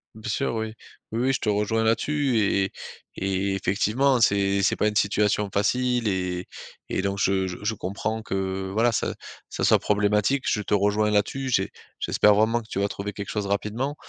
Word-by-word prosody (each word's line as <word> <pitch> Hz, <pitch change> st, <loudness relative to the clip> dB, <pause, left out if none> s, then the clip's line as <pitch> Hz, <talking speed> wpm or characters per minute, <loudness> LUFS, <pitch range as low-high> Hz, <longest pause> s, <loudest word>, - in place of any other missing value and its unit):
Bien 110 Hz, 0 st, -7 dB
sûr, 125 Hz, +2 st, -1 dB
oui. 110 Hz, -1 st, -3 dB, 0.4 s
Oui, 115 Hz, -, -2 dB
oui, 130 Hz, +2 st, +2 dB
je -, -, 0 dB
te 110 Hz, -, -1 dB
rejoins 105 Hz, +2 st, +1 dB
là-dessus 130 Hz, +3 st, +1 dB
et 100 Hz, -2 st, +2 dB
et 95 Hz, -, -6 dB, 0.5 s
et 95 Hz, 0 st, 0 dB
effectivement, 110 Hz, +8 st, +1 dB
hein, 120 Hz, -, +1 dB
c'est 100 Hz, -2 st, +3 dB
c'est 95 Hz, -, +3 dB
pas 105 Hz, -, +1 dB
une 105 Hz, -, -1 dB
situation 105 Hz, 0 st, +1 dB
facile 125 Hz, +3 st, +1 dB
et 90 Hz, -2 st, -2 dB, 0.4 s
et -, -, -1 dB
donc 100 Hz, 0 st, -2 dB
je 95 Hz, -1 st, +1 dB
je 90 Hz, -, -6 dB
je 110 Hz, +2 st, 0 dB
comprends 110 Hz, +3 st, -3 dB
que, 95 Hz, -2 st, -3 dB
voilà, 115 Hz, +3 st, +3 dB
ça 115 Hz, -, -1 dB, 0.4 s
ça -, -, -4 dB
soit -, -, +5 dB
problématique. 105 Hz, +5 st, +1 dB
Je 105 Hz, -, 0 dB
te 105 Hz, -, -3 dB
rejoins 105 Hz, +1 st, +2 dB
là-dessus. 120 Hz, +6 st, 0 dB
J'ai 95 Hz, -6 st, +1 dB, 0.3 s
j'espère 105 Hz, -, +4 dB
vraiment 110 Hz, +3 st, +2 dB
que 110 Hz, -, -16 dB
tu 100 Hz, -, -3 dB
vas 100 Hz, -, +2 dB
trouver 100 Hz, 0 st, -5 dB
quelque 100 Hz, 0 st, -6 dB
chose 105 Hz, -2 st, -2 dB
rapidement. 105 Hz, +8 st, -2 dB
105 Hz, 200 wpm, -25 LUFS, 100-115 Hz, 0.5 s, soit